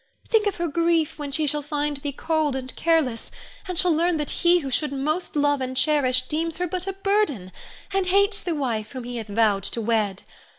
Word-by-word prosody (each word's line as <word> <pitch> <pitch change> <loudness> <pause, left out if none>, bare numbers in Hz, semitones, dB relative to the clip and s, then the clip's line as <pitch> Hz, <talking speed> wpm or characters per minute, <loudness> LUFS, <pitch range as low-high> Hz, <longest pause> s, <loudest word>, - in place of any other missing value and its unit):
Think 440 -3 +3
of 405 - 0
her 345 0 -1
grief 330 0 +1
when 290 -1 -4
she 310 +2 0
shall 295 +1 +1
find 295 0 -2
thee 285 +1 -4
cold 310 -1 0
and 260 -1 -5
careless, 310 -9 +1 0.4
and 365 -2 -3
shall 360 -1 +3
learn 340 +2 +2
that 295 -1 -2
he 350 +1 +5
who 275 -6 -4
should 295 +2 0
most 305 +7 -2
love 290 -1 +2
and 260 0 -3
cherish, 260 -4 +3
deems 320 +4 -2
her 360 - 0
but 360 +2 -4
a 390 - -1
burden, 390 - 0 0.4
and 385 -1 +1
hates 400 +2 +3
the 345 -3 -2
wife 230 -6 -2
whom 255 -2 -5
he 245 0 -5
hath 225 -2 -5
vowed 205 -1 +2
to - - -3
wed. 215 -4 0
295 Hz, 215 wpm, -24 LUFS, 255-340 Hz, 0.4 s, he